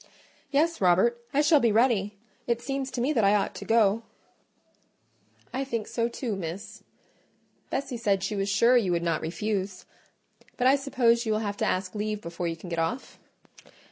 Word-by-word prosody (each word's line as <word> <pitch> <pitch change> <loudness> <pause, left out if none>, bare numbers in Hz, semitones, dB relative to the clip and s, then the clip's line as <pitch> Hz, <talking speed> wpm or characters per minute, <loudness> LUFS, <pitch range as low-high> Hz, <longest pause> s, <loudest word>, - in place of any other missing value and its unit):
"Yes, 320 +2 +1
Robert, 190 +7 +3
I 285 - +3
shall 300 0 +5
be 235 -4 +3
ready: 210 -3 +2 0.3
it 235 -1 +1
seems 270 +1 -3
to 245 - -4
me 275 +5 +1
that 230 -6 +2
I 200 +1 +5
ought 200 - 0
to - - -8
go." 225 -1 +3 1.5
"I 265 - -1
think 230 -5 -3
so 235 0 -1
too, 235 -2 -3
Miss. 180 +1 -7 0.9
Bessie 265 -2 -3
said 200 -4 0
she 210 +2 -2
was 195 0 -1
sure 235 +5 +4
you 215 -7 +3
would 170 0 0
not 165 -2 0
refuse: 190 +2 -3 0.7
but 250 - 0
I 265 +2 +6
suppose 245 -4 +1
you - - +1
will 215 - 0
have 205 -2 -3
to - - 0
ask 185 0 -1
leave 210 0 -2
before 170 -2 -5
you 165 - -2
can 170 - -11
get 170 -1 -2
off?" 220 +11 -3
215 Hz, 185 wpm, -27 LUFS, 195-245 Hz, 1.5 s, I